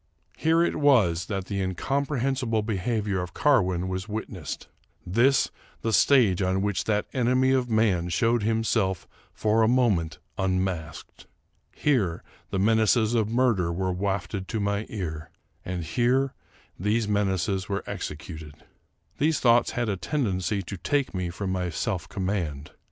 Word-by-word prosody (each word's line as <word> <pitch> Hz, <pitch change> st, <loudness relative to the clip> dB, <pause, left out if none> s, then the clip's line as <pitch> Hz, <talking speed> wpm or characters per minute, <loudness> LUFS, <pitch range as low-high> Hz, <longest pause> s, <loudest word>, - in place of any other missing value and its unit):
Here 165 Hz, +1 st, +3 dB
it -, -, 0 dB
was 105 Hz, -, +3 dB
that 95 Hz, -3 st, -3 dB
the 100 Hz, +1 st, -3 dB
incomprehensible 130 Hz, -, -1 dB
behavior 105 Hz, -2 st, -1 dB
of 90 Hz, -, -7 dB
Car 145 Hz, -4 st, +4 dB
win 90 Hz, -1 st, -2 dB
was 95 Hz, +2 st, -4 dB
witnessed; 105 Hz, -5 st, -5 dB, 0.4 s
this 120 Hz, +9 st, +3 dB, 0.3 s
the 115 Hz, -, 0 dB
stage 105 Hz, -3 st, +4 dB
on 95 Hz, +1 st, +1 dB
which 105 Hz, -2 st, -1 dB
that 105 Hz, -1 st, +1 dB
enemy 130 Hz, +1 st, +2 dB
of 130 Hz, -2 st, +1 dB
man 105 Hz, -6 st, +2 dB
showed 115 Hz, +6 st, +2 dB
himself 110 Hz, -4 st, 0 dB, 0.2 s
for 110 Hz, +1 st, +1 dB
a 110 Hz, -, +4 dB
moment 110 Hz, -10 st, +2 dB, 0.2 s
unmasked. 95 Hz, -3 st, -3 dB, 0.4 s
Here 105 Hz, -, 0 dB, 0.3 s
the -, -, -2 dB
menaces 110 Hz, +2 st, +3 dB
of 110 Hz, -3 st, +1 dB
murder 115 Hz, -8 st, +2 dB
were 95 Hz, +2 st, -1 dB
wafted 95 Hz, 0 st, -2 dB
to 110 Hz, -, -2 dB
my 100 Hz, +1 st, -1 dB
ear; 80 Hz, -7 st, -5 dB, 0.3 s
and 90 Hz, -1 st, -4 dB
here 125 Hz, -, +1 dB, 0.5 s
these 105 Hz, +4 st, +1 dB
menaces 95 Hz, -1 st, 0 dB
were 100 Hz, 0 st, -2 dB
executed. 75 Hz, 0 st, -7 dB, 0.6 s
These 155 Hz, +1 st, +2 dB
thoughts 120 Hz, -1 st, +4 dB
had 120 Hz, -1 st, -1 dB
a 100 Hz, -2 st, -1 dB
tendency 100 Hz, -, -1 dB
to 95 Hz, +2 st, -6 dB
take 140 Hz, -, 0 dB, 0.2 s
from 100 Hz, +3 st, -5 dB
me 95 Hz, -, -1 dB
my 90 Hz, -1 st, -1 dB
self 85 Hz, 0 st, -3 dB
command. 90 Hz, -8 st, -3 dB
105 Hz, 145 wpm, -26 LUFS, 95-120 Hz, 0.6 s, Car